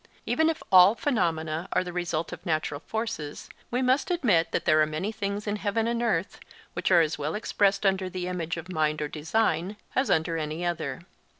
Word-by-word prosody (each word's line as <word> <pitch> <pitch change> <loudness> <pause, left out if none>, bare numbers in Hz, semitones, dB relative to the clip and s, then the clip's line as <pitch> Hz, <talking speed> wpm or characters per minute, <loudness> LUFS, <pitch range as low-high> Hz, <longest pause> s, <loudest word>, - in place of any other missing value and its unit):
Even 320 0 +2
if 325 - -3
all 185 +3 +8
phenomena 165 - -1
are - - +2
the 180 -1 -7
result 170 -2 -2
of - - -9
natural 155 -3 -1
forces, 220 -10 -4 0.2
we 250 +2 0
must 260 +4 +2
admit 230 - +2
that - - -1
there 155 -1 +5
are 155 - +3
many 155 +7 -3
things 205 -1 -3
in 210 0 -1
heaven 210 +2 0
and 235 0 -1
earth 195 -7 -1 0.3
which - - -1
are 175 -3 +6
as 155 -1 -1
well 150 +2 -2
expressed 200 -1 +1
under 190 -1 +1
the 185 0 -4
image 170 -2 -3
of 175 +3 -7
mind 155 -1 +1
or 150 - -1
design 170 +4 -1 0.2
as 260 +1 +1
under 165 +1 +1
any 155 +3 -3
other. 175 -1 -3
180 Hz, 200 wpm, -27 LUFS, 160-215 Hz, 0.3 s, all